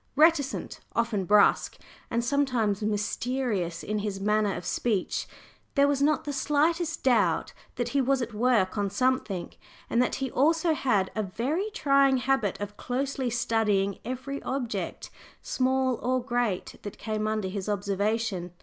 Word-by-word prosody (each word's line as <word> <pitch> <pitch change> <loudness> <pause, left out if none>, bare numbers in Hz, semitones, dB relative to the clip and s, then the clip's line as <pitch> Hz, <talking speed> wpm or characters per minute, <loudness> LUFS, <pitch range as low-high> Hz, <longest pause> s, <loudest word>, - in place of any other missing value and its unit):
Reticent, 300 -2 +2 0.2
often 230 -5 0
brusque, 205 +2 +4 0.3
and 235 +1 0
sometimes 240 -7 +1
mysterious 210 -3 -1
in 210 +1 -2
his 205 -2 -3
manner 210 0 +1
of 175 - -6
speech, 210 -3 -1 0.5
there 280 0 +5
was 285 -1 +1
not 295 -1 +2
the 290 - -4
slightest 320 +4 +1
doubt 210 -10 +2 0.2
that 245 -1 -2
he 275 +2 +2
was 270 +1 +2
at 240 -2 -4
work 215 -3 +2
on 200 -1 0
something, 215 -4 -1 0.4
and 235 - +3
that 250 - +1
he 265 -2 -3
also 320 +4 +3
had 210 -10 +1
a 215 - 0
very 260 - -2
trying 275 - +3
habit 255 -6 0
of 205 0 -6
closely 265 0 -2
studying 215 -4 +1
every 260 +3 -5
object, 255 -3 -4 0.3
small 260 -1 +1
or 255 +1 +1
great, 240 -6 -2
that 205 - -7
came 215 -1 -2
under 215 -2 -1
his 195 +1 -4
observation. 200 -2 -1
235 Hz, 150 wpm, -27 LUFS, 205-270 Hz, 0.5 s, there